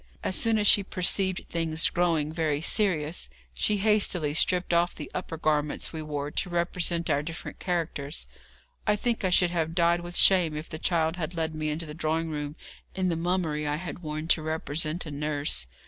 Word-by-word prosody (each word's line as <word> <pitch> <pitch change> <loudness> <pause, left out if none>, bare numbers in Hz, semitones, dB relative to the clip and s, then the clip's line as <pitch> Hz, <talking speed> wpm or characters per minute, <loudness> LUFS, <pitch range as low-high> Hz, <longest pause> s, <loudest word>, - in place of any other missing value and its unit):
As 185 - 0
soon 225 -1 +3
as 210 - +1
she 205 - +7
perceived 190 -1 +1
things 165 -1 +1
growing 165 -4 +1
very 155 -3 0
serious, 165 - 0 0.2
she 210 - +1
hastily 195 -7 +2
stripped 180 +2 +2
off 170 +1 +2
the 150 - -8
upper 165 - -4
garments 150 -1 -1
we 160 - -4
wore 145 -1 -4
to 180 - -2
represent 170 0 0
our 140 - +2
different 165 +2 -7
characters. 165 -5 -3 0.6
I 210 - +4
think 230 +1 -1
I 185 - +2
should 180 -1 +4
have 165 -2 -1
died 170 0 +3
with 175 0 -5
shame 175 -6 +5
if 155 - -7
the 155 - -6
child 165 -1 +1
had 170 0 -4
led 160 -1 -1
me 155 0 -2
into 155 +2 -2
the 150 - -8
drawing 160 +1 -1
room 150 -1 -4 0.4
in 185 -1 0
the 170 - 0
mummery 165 -3 -1
I 145 - 0
had 175 +3 -6
worn 155 -1 -5
to 160 - +4
represent 155 +1 -1
a 155 - -6
nurse. 145 - -1
165 Hz, 195 wpm, -27 LUFS, 155-180 Hz, 0.6 s, she